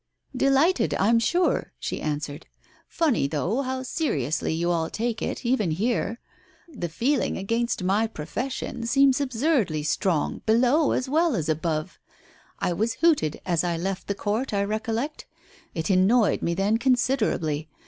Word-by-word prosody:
"Delighted, 275 Hz, -, +3 dB
I'm 225 Hz, +7 st, +3 dB
sure," 350 Hz, +10 st, +1 dB
she -, -, -4 dB
answered. 150 Hz, 0 st, -4 dB, 0.4 s
"Funny, 295 Hz, -, +1 dB
though, 170 Hz, -, -1 dB
how 260 Hz, -1 st, -3 dB
seriously 160 Hz, -, -1 dB
you 170 Hz, +2 st, 0 dB
all 165 Hz, -1 st, 0 dB
take 230 Hz, 0 st, -2 dB
it, -, -, -4 dB
even 235 Hz, -7 st, +1 dB
here! 225 Hz, +5 st, -1 dB, 0.5 s
The 225 Hz, -, -5 dB
feeling 255 Hz, -, 0 dB
against 230 Hz, +2 st, -1 dB
my 200 Hz, +5 st, +2 dB
profession 230 Hz, -, -4 dB
seems 275 Hz, +2 st, +4 dB
absurdly 250 Hz, -, 0 dB
strong 155 Hz, +1 st, 0 dB
below 250 Hz, +7 st, +3 dB
as 255 Hz, -, -1 dB
well 315 Hz, +1 st, +2 dB
as 165 Hz, -5 st, -2 dB
above. 155 Hz, 0 st, -2 dB, 0.6 s
I 175 Hz, -, -1 dB
was 220 Hz, +6 st, -1 dB
hooted 300 Hz, -, +2 dB
as 170 Hz, -2 st, +1 dB
I 170 Hz, -1 st, -1 dB
left 190 Hz, +2 st, -3 dB
the 200 Hz, -, -1 dB
court, 215 Hz, +4 st, -2 dB
I 200 Hz, -, +2 dB
recollect. 225 Hz, +7 st, -3 dB, 0.5 s
It 160 Hz, +2 st, -1 dB
annoyed 200 Hz, +5 st, +3 dB
me 170 Hz, -, 0 dB
then 205 Hz, +4 st, +1 dB
considerably. 230 Hz, -, +1 dB
220 Hz, 145 wpm, -25 LUFS, 170-260 Hz, 0.6 s, seems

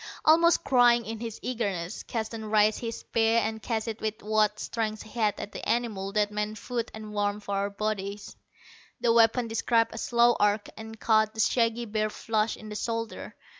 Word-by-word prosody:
Almost 335 Hz, +2 st, +5 dB
crying 240 Hz, -2 st, +4 dB
in 225 Hz, 0 st, -5 dB
his 230 Hz, -1 st, -5 dB
eagerness, 200 Hz, -8 st, -3 dB
Keston 220 Hz, -1 st, -4 dB
raised 215 Hz, 0 st, +3 dB
his 230 Hz, -1 st, -5 dB
spear 225 Hz, 0 st, +2 dB
and 220 Hz, 0 st, -1 dB
cast 225 Hz, -1 st, -2 dB
it 225 Hz, 0 st, -5 dB
with 215 Hz, 0 st, -3 dB
what 215 Hz, 0 st, +1 dB
strength 215 Hz, -2 st, -3 dB
he 220 Hz, -, -14 dB
had 210 Hz, -2 st, +1 dB
at 205 Hz, -, -6 dB
the -, -, -6 dB
animal 215 Hz, -5 st, -1 dB
that 210 Hz, 0 st, +1 dB
meant 210 Hz, +1 st, -3 dB
food 235 Hz, +1 st, -3 dB
and 215 Hz, -1 st, -9 dB
warmth 205 Hz, 0 st, -1 dB
for 200 Hz, -, -4 dB
our 200 Hz, +1 st, 0 dB
bodies. 200 Hz, -1 st, -4 dB, 0.6 s
The 235 Hz, -1 st, +3 dB
weapon 230 Hz, +1 st, +4 dB
described 230 Hz, 0 st, +1 dB
a 225 Hz, -, -6 dB
slow 240 Hz, 0 st, +3 dB
arc, 205 Hz, 0 st, +2 dB
and 220 Hz, 0 st, -9 dB
caught 215 Hz, -1 st, +2 dB
the -, -, -8 dB
shaggy 230 Hz, 0 st, +2 dB
bear 215 Hz, 0 st, -1 dB
flush 220 Hz, 0 st, -1 dB
in 215 Hz, -, -10 dB
the 210 Hz, -, -6 dB
shoulder. 230 Hz, +1 st, -4 dB
220 Hz, 190 wpm, -27 LUFS, 210-230 Hz, 0.6 s, Almost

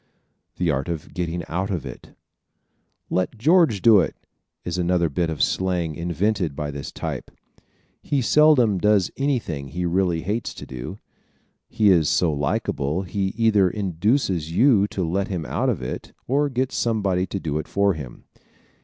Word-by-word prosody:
The 85 Hz, -2 st, +1 dB
Art 70 Hz, +2 st, -2 dB
of 80 Hz, -3 st, -5 dB
Getting 85 Hz, -1 st, -3 dB
Out 95 Hz, +4 st, -2 dB
Of 90 Hz, -8 st, -3 dB
It -, -, -9 dB
¶ -, -, -34 dB, 1.0 s
"Let 95 Hz, +5 st, -1 dB
George 150 Hz, -, +3 dB
do 110 Hz, -3 st, +7 dB
it" 90 Hz, -, 0 dB, 0.5 s
is 90 Hz, +1 st, -2 dB
another 85 Hz, -1 st, +1 dB
bit 85 Hz, +3 st, 0 dB
of 80 Hz, -, 0 dB
slang 90 Hz, -4 st, 0 dB
invented 85 Hz, 0 st, -1 dB
by 75 Hz, 0 st, -3 dB
this 70 Hz, -1 st, -6 dB
type. -, -, -5 dB, 0.7 s
He 145 Hz, -, 0 dB
seldom 130 Hz, -6 st, +4 dB
does 105 Hz, -2 st, +3 dB
anything 115 Hz, -, -2 dB
he 90 Hz, +6 st, -3 dB
really 85 Hz, -1 st, +1 dB
hates 105 Hz, +5 st, -3 dB
to -, -, -8 dB
do. 65 Hz, -2 st, -7 dB, 0.7 s
He 105 Hz, -2 st, +3 dB
is 80 Hz, -5 st, +3 dB
so 85 Hz, -3 st, +2 dB
likable 75 Hz, +3 st, -1 dB
he 95 Hz, +1 st, -2 dB
either 105 Hz, -5 st, +4 dB
induces 95 Hz, -, 0 dB
you 105 Hz, +1 st, +4 dB
to 95 Hz, -4 st, -3 dB
let 95 Hz, +4 st, -1 dB
him 90 Hz, -5 st, -4 dB
out -, -, -1 dB
of 65 Hz, -, -2 dB
it 60 Hz, -, -6 dB
or 145 Hz, +3 st, +2 dB
gets 130 Hz, 0 st, -2 dB
somebody 100 Hz, -5 st, 0 dB
to 95 Hz, -, -4 dB
do 75 Hz, -3 st, -2 dB
it 75 Hz, -, -6 dB
for 100 Hz, 0 st, +2 dB
him. 70 Hz, -7 st, -9 dB
90 Hz, 165 wpm, -23 LUFS, 80-105 Hz, 1.0 s, do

